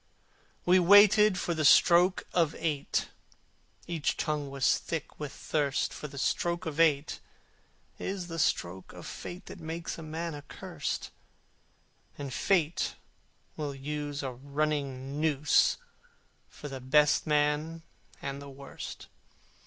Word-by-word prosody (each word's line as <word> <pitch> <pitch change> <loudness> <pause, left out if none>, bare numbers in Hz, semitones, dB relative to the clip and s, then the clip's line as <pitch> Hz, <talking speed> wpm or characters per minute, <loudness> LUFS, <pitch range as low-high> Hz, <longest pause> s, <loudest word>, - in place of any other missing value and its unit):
We 180 +1 +6
waited 205 +2 +7
for 175 - -1
the 160 -1 -1
stroke 175 +5 +6
of 165 -3 +2
eight: 150 -4 -1 0.8
Each 165 -3 -1
tongue 150 -3 -2
was 135 -1 +2
thick 165 -3 -5
with 150 -2 -4
thirst: 145 -3 -1
For 150 - -6
the 140 - -11
stroke 170 +5 0
of 160 -1 -4
eight 155 -3 +3 0.8
is 190 -2 -3
the 165 -1 -6
stroke 95 - -1
of - - -10
Fate 180 +1 -8
That 190 0 -10
makes 165 +1 -5
a - - -7
man 160 +1 -4
accursed, 145 -1 -5 1.1
And 140 -3 -5
Fate 170 -4 +1 0.6
will 145 -2 -4
use 145 +1 -4
a 135 - -2
running 140 0 -3
noose 150 -2 +3 0.7
For 145 - -9
the 135 -2 -7
best 150 +5 +3
man 150 +2 +1 0.4
and 140 0 -4
the 140 - -9
worst. 140 0 -9
150 Hz, 130 wpm, -30 LUFS, 140-170 Hz, 1.1 s, waited